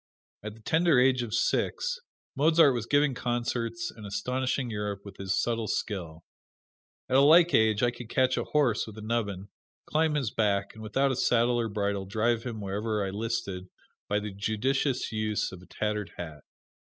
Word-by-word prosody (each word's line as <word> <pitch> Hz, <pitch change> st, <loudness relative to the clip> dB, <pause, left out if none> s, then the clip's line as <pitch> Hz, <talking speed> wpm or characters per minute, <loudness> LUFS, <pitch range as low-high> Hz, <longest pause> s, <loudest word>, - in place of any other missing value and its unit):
At 105 Hz, 0 st, -7 dB
the 110 Hz, -, -17 dB
tender 160 Hz, +2 st, +3 dB
age 125 Hz, 0 st, +4 dB
of 115 Hz, -2 st, -3 dB
six, 485 Hz, -, 0 dB, 0.4 s
Mozart 155 Hz, 0 st, +5 dB
was 115 Hz, -2 st, -3 dB
giving 145 Hz, 0 st, +3 dB
concerts 120 Hz, +6 st, -2 dB
and 110 Hz, -, -11 dB
astonishing 125 Hz, +4 st, -2 dB
Europe 105 Hz, -1 st, -4 dB
with 100 Hz, -, -10 dB
his 95 Hz, -1 st, -1 dB
subtle 115 Hz, -2 st, -1 dB
skill. 85 Hz, -8 st, -3 dB, 0.8 s
At 130 Hz, -, +3 dB
a -, -, +7 dB
like 165 Hz, +4 st, +6 dB
age 110 Hz, 0 st, +3 dB
I 120 Hz, -, +3 dB
could 120 Hz, -1 st, -10 dB
catch 130 Hz, +1 st, +2 dB
a -, -, -2 dB
horse 130 Hz, -8 st, +1 dB
with 110 Hz, -1 st, -10 dB
a 110 Hz, -, -8 dB
nubbin, 100 Hz, -4 st, -2 dB, 0.4 s
climb 155 Hz, 0 st, +1 dB
his 135 Hz, -8 st, -1 dB
back, 100 Hz, -3 st, 0 dB
and 110 Hz, -, -12 dB
without 135 Hz, +5 st, +1 dB
a -, -, -1 dB
saddle 120 Hz, 0 st, +2 dB
or 115 Hz, -1 st, -1 dB
bridle 100 Hz, -2 st, -2 dB
drive 115 Hz, +3 st, +1 dB
him 115 Hz, -4 st, -5 dB
wherever 105 Hz, +1 st, -2 dB
I 95 Hz, -, -3 dB
listed 100 Hz, -3 st, -3 dB, 0.4 s
by 105 Hz, -, +2 dB
the 105 Hz, 0 st, -5 dB
judicious 120 Hz, +7 st, -1 dB
use 110 Hz, -1 st, -1 dB
of 95 Hz, -1 st, -10 dB
a 90 Hz, -, -16 dB
tattered 105 Hz, -1 st, -3 dB
hat. 80 Hz, -4 st, -7 dB
115 Hz, 180 wpm, -28 LUFS, 105-130 Hz, 0.8 s, a